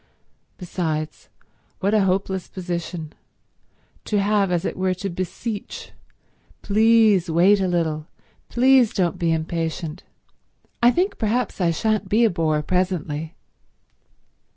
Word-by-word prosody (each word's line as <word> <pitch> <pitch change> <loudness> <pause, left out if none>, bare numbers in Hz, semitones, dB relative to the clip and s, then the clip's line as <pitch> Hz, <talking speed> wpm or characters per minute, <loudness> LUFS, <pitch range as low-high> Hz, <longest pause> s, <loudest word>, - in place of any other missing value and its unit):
Besides, 160 -4 -4 0.5
what 200 +2 0
a 210 -3 +4
hopeless 190 -1 -1
position, 175 -3 -5 0.9
to 210 - 0
have 200 -1 +2
as 175 +1 0
it - - -2
were 185 0 0
to 195 +1 -4
beseech: 185 +5 -5 0.7
Please 215 -3 +4
wait 180 +5 +4
a 190 - +1
little—please 180 +9 +1
don't 180 -1 0
be 170 -2 +1
impatient—I 165 +7 -3
think 360 +10 0
perhaps 230 -1 -1
I 175 - +3
shan't 215 +5 0
be 230 +3 +4
a 225 - +3
bore 155 -3 0
presently. 170 -3 -2
185 Hz, 110 wpm, -22 LUFS, 165-210 Hz, 0.9 s, a